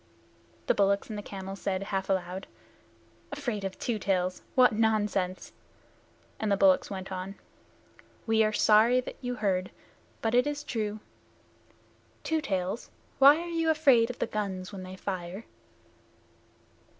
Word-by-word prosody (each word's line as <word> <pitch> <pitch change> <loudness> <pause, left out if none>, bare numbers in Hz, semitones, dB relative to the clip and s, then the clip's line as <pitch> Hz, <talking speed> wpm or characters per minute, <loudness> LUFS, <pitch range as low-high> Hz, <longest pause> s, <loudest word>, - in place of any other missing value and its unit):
The - - +3
bullocks 200 +1 +1
and - - -4
the 205 - -4
camel 195 -1 -7
said, 195 -1 -2
half 195 -1 -3
aloud, 190 0 -2 0.8
"Afraid 245 -8 -3
of 195 -1 -4
Two 230 -3 -2
Tails 185 -2 0
what 255 -1 +6
nonsense!" 210 -4 0 0.9
And 215 -2 -1
the 200 - +3
bullocks 190 -1 +4
went 190 -1 -6
on, 190 +1 -5 0.9
"We 225 -1 +3
are 215 - +2
sorry 220 +4 +5
that - - -9
you 245 -1 -3
heard, 190 -4 0 0.5
but 225 0 0
it 250 +3 +4
is 290 0 -3
true. 215 -6 -3 1.2
Two 320 -1 0
Tails, 190 -1 -3 0.3
why 280 +2 +9
are 345 - -6
you 330 -1 0
afraid 275 -7 +4
of 250 - -6
the - - 0
guns 195 -3 -4
when 195 - -6
they 185 0 -8
fire?" 185 +1 -5
205 Hz, 145 wpm, -29 LUFS, 190-235 Hz, 1.2 s, why